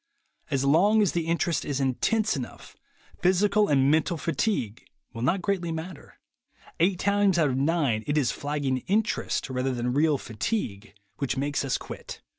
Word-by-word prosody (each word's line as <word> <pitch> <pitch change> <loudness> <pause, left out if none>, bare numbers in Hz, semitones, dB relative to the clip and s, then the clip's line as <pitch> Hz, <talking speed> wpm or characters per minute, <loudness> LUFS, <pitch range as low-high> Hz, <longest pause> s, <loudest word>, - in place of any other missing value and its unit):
As 135 -2 0
long 200 +10 +4
as 200 - +1
the 170 -2 -2
interest 170 -1 0
is 140 -2 -2
intense 205 - +1
enough, 130 -3 -8 0.5
physical 200 +4 +3
and 135 -1 +3
mental 160 +2 +1
fatigue 145 - -2 0.3
will 115 - -6
not 175 +9 +1
greatly 180 -4 -1
matter. 160 0 -7 0.6
Eight 180 +3 +3
times 200 -1 +2
out 155 -4 +3
of - - -1
nine 140 -6 +1
it 145 +1 0
is 140 -5 +2
flagging 145 -3 -2
interest, 215 +3 0
rather 130 0 -1
than 120 +1 -1
real 150 +1 +3
fatigue, 110 - -4 0.2
which 135 -1 -2
makes 140 +1 -1
us 135 -2 0
quit. - - -9
150 Hz, 160 wpm, -26 LUFS, 135-185 Hz, 0.6 s, long